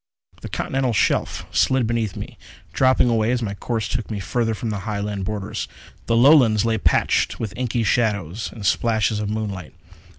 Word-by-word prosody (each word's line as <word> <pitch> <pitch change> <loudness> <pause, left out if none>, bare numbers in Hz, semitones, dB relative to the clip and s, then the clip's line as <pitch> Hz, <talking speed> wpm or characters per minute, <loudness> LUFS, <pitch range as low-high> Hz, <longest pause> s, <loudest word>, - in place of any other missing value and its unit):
The - - -7
Continental 130 -2 -1
Shelf - - 0
slid 130 -2 +2
beneath 115 -3 -1
me, - - -8 0.3
dropping 130 -1 +4
away 115 -2 +2
as 125 -1 0
my 100 -2 -2
course 110 +2 -3
took 120 -1 -3
me 105 -3 -3
further 115 +3 -1
from 115 +1 -4
the 105 - -3
Highland 100 -1 -3
borders. 105 -1 -4 0.4
The 115 - +2
Lowlands 120 -5 +5
lay 110 -1 +1
patched - - +1
with 105 -5 -4
inky 120 -2 -1
shadows 105 -3 0
and 105 -3 -8
splashes 110 0 +1
of 105 -1 -2
moonlight. 100 -6 -4
110 Hz, 170 wpm, -22 LUFS, 105-120 Hz, 0.4 s, Lowlands